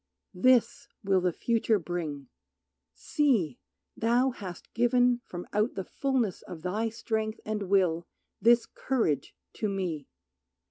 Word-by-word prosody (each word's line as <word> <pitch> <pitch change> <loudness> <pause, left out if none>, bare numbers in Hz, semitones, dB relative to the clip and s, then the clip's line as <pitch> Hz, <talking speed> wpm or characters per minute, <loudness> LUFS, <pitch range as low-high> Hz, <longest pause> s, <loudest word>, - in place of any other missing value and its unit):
This 250 +5 +3 0.2
will 190 -2 +3
the 180 0 +2
future 225 +3 +1
bring. 160 -6 -4 0.7
See! 230 - +1 0.4
Thou 240 +4 +2
hast 190 -7 -9
given 245 +1 +3
From 175 0 -6
out 210 +3 +1
the 190 - -3
fulness 260 -8 -1
of 165 -3 -10
thy 210 +5 -1
strength 220 -1 -3
and 210 -3 -3
will 175 -4 +2 0.3
This 235 +3 +5
courage 230 - -1 0.2
to 215 - -1
me. 180 -7 -3
210 Hz, 125 wpm, -29 LUFS, 180-235 Hz, 0.7 s, This